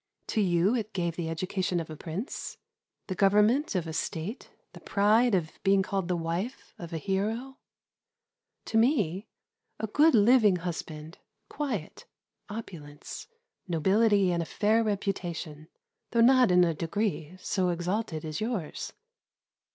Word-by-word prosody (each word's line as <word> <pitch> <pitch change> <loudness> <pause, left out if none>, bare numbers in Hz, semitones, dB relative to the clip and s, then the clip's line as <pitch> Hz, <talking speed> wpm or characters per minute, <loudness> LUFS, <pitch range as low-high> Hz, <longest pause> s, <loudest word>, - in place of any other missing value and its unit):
To 220 - +1
you 180 +2 +3
it 220 -3 -3
gave 170 -3 -1
the 170 -2 -3
education 180 +2 -1
of 160 -1 -6
a - - -6
prince, 170 - -6 0.5
the 190 - -3
government 210 +8 +3
of 180 -3 0
a 160 - -5
state, 165 - -4 0.2
the - - -11
pride 215 +3 +3
of 160 -4 -3
being 195 0 +4
called 190 -2 -2
the 180 - 0
wife 170 +9 -4
of 170 -1 -8
a 165 - -2
hero; 215 - -2 1.1
to 225 - 0
me 215 - +1 0.5
a - - -1
good 295 +8 +4
living 215 -2 +5
husband, 165 -2 -6 0.3
quiet, 245 - -4 0.4
opulence, 160 -9 -8 0.4
nobility, 195 +3 +3
and 170 -1 0
a - - -3
fair 220 +2 +2
reputation, 175 -7 -3 0.4
though 235 - +2
not 255 0 +6
in 180 0 +6
a 170 -1 +2
degree 175 0 -2
so 185 -1 0
exalted 175 -1 -2
as 155 +2 -4
yours. 215 -9 -3
190 Hz, 140 wpm, -28 LUFS, 170-220 Hz, 1.1 s, not